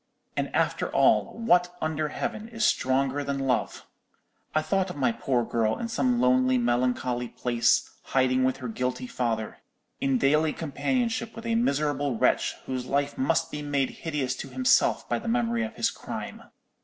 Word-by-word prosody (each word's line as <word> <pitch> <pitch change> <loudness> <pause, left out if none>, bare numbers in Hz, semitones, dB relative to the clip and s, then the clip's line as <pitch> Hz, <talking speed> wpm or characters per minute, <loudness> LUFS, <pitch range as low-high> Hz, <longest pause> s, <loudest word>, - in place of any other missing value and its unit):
And - - 0
after - - +1
all, - - +3
what 180 -6 +2
under 155 -1 -1
heaven 215 +8 -4
is 230 -2 -1
stronger 135 +2 +1
than 140 0 -2
love? 135 -2 -1 0.7
I 155 - +3
thought 190 +2 0
of 180 - -6
my 135 -4 +2
poor 120 +1 0
girl 110 -2 0
in 230 - -4
some 125 - +1
lonely, 130 +1 +3
melancholy 125 0 0
place, 120 0 +1 0.2
hiding 130 -1 +2
with 130 0 +1
her 130 -2 -6
guilty 125 - -2
father; 115 - -2 0.4
in 135 -1 +1
daily 150 +4 +3
companionship 230 - -2
with 230 - -8
a 230 - 0
miserable 145 - 0
wretch, - - +2
whose 130 -1 -4
life 140 +1 0
must 165 +4 +1
be 150 - -4
made 140 -2 0
hideous 145 -6 -2
to - - -6
himself 255 0 +2
by - - 0
the - - -8
memory 235 0 +1
of 230 0 -5
his - - +1
crime. - - -7
140 Hz, 170 wpm, -27 LUFS, 125-180 Hz, 0.7 s, all